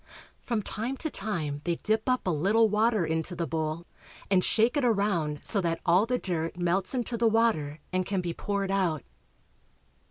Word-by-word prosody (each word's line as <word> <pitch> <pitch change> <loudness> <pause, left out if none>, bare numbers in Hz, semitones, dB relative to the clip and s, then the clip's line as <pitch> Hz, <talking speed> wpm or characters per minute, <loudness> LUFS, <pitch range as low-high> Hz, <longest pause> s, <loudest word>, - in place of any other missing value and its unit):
From 230 -4 -2
time 235 +8 -3
to 315 +1 -3
time 155 -9 -3
they 170 -1 0
dip 215 +6 -1
up 255 0 +1
a 185 - +1
little 200 +9 +3
water 215 -2 +2
into 160 +2 -1
the 170 0 -2
bowl, 160 +2 -3 0.5
and 185 -2 +4
shake 230 +2 +3
it 290 - +1
around 200 -10 +1
so 200 - +4
that 165 -2 -1
all 185 +5 +4
the 250 +1 +1
dirt 170 -5 -3
melts 180 +5 0
into 240 -1 -1
the 230 0 +3
water 220 -10 +1 0.2
and 185 0 +1
can 195 +1 -2
be 175 -2 -3
poured 200 0 -2
out. 175 -7 0
195 Hz, 185 wpm, -28 LUFS, 165-225 Hz, 0.5 s, and